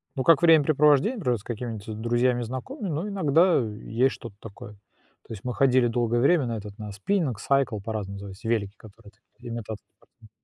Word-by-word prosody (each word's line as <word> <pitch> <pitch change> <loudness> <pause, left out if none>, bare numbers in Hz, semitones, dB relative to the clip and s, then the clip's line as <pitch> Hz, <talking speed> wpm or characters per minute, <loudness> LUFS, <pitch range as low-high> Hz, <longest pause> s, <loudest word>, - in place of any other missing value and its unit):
Ну 130 - -1
как 165 +1 +5
времяпрепровождение, 155 - +4
например, 125 - 0
с - - -17
какими-нибудь 115 -3 -5
с 110 - -6
друзьями 120 +2 +1
и - - -2
знакомыми, 155 - -6
но 165 +5 -3
иногда 180 -3 +3
и 110 -4 -6
есть 125 +3 +2
что-то 115 -4 -11
такое. 105 -1 -11 0.5
То - - -7
есть 105 - -10
мы 125 - -3
ходили 130 -1 +3
долгое 120 0 0
время 150 +1 +3
на 115 -1 -3
этот 105 -1 -9
на 105 -1 -7
спиннинг, 130 - -1
сайкл, 135 -3 +1
по-разному 105 -1 -5
называется, 100 +3 -9
велики, 105 -4 -1
которые 105 0 -16 0.3
имитация 115 -3 -7
такая. 110 - -22
120 Hz, 190 wpm, -25 LUFS, 110-140 Hz, 0.5 s, как